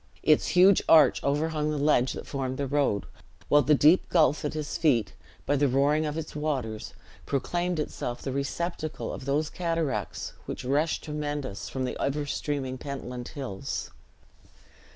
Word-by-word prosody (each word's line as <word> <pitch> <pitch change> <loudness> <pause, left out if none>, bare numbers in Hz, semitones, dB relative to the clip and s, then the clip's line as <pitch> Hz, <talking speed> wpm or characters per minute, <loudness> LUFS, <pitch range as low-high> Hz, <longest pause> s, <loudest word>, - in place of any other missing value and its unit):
Its 155 -1 +4
huge 185 +2 +6
arch 155 -5 +6
overhung 150 +2 0
the 155 - -1
ledge 140 -3 +2
that - - -7
formed 130 -2 -3
the 140 - -1
road, 135 -7 +1 0.4
while 145 - +6
the 150 +3 +4
deep 155 +6 +4
gulf 155 -4 +3
at 150 - -2
his 150 -1 -3
feet, 115 - +2 0.3
by 145 - +2
the 145 0 +3
roaring 145 +4 +2
of 150 +1 -3
its 160 -2 -6
waters, 130 -8 -3 0.3
proclaimed 175 +6 -1
itself 120 -4 -3
the 135 - -3
receptacle 155 +4 -3
of 130 - -7
those 150 +3 0
cataracts 165 - -2
which - - -5
rush 150 +5 +1
tremendous 145 -7 -4
from 130 -1 -2
the - - -3
ever 145 +1 -1
streaming 135 -3 -3
Pentland 125 -3 -6
hills. 130 -9 -5
145 Hz, 155 wpm, -27 LUFS, 130-155 Hz, 0.4 s, huge